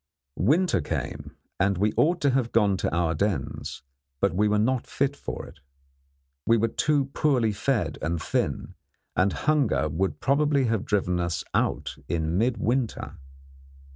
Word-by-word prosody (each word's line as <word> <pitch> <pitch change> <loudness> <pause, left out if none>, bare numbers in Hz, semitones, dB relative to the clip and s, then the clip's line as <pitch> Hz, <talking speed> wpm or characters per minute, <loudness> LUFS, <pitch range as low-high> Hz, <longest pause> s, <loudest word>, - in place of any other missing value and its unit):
Winter 150 - +3
came, - - -5 0.2
and 95 -1 +2
we 105 +3 +1
ought 175 +3 +3
to 140 - +3
have 130 -3 0
gone 105 -4 +3
to - - -1
our 80 -1 +1
dens, 85 -7 -2 0.4
but 100 +1 +2
we 105 +4 +2
were 105 0 +2
not 125 +4 +1
fit 140 0 0
for - - -6
it. - - -14 0.9
We 115 - +5
were 115 +1 +1
too 140 +2 +1
poorly 125 -7 +2
fed 120 +3 -1
and 85 +1 -1
thin, - - -2 0.4
and 95 +2 +3
hunger 125 - +1
would 95 +6 -1
probably 140 0 +2
have 115 -4 0
driven 90 -3 0
us 85 -3 -2
out - - -1
in 80 0 -1
midwinter. 120 +1 -1
110 Hz, 150 wpm, -26 LUFS, 90-135 Hz, 0.9 s, We